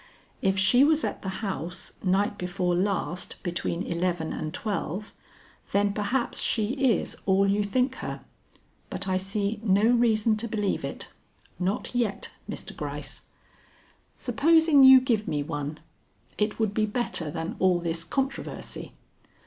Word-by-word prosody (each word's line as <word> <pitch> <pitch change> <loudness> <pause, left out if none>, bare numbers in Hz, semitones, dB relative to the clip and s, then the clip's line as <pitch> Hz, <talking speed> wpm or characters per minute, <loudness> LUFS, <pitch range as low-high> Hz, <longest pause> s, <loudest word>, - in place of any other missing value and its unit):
"If 195 0 +2
she 195 +8 +5
was 310 +1 +3
at - - -3
the 190 - -4 0.2
house 180 -3 -4
night 200 +2 +2
before 180 0 -1
last 185 0 -1
between 175 0 -2
eleven 170 -1 -1
and 155 - -4
twelve, 205 +1 -4 0.6
then 200 0 +2
perhaps 225 +5 -1
she 215 -2 +2
is 265 -4 +1
all 195 +1 +4
you 205 +1 +2
think 250 +6 +1
her. - - -5 0.7
But 195 - -3
I 185 0 +1
see 200 +3 -1
no 200 -1 +3
reason 225 -2 +3
to 230 +2 -2
believe 210 -3 -1
it - - -5 0.5
not 190 +6 -2
yet, 235 -5 -1 0.2
Mr. - - -5
Gryce. - - -6 0.9
Supposing 305 +3 +4
you 265 0 +10
give 230 -5 0
me 145 -1 -1
one. 145 +1 -4 0.6
It 210 0 -1
would 220 -3 0
be 215 0 +1
better 205 -8 -2
than 165 +3 -4
all 185 -2 +4
this 165 -1 -2
controversy. 270 +10 -4
200 Hz, 140 wpm, -27 LUFS, 180-235 Hz, 0.9 s, you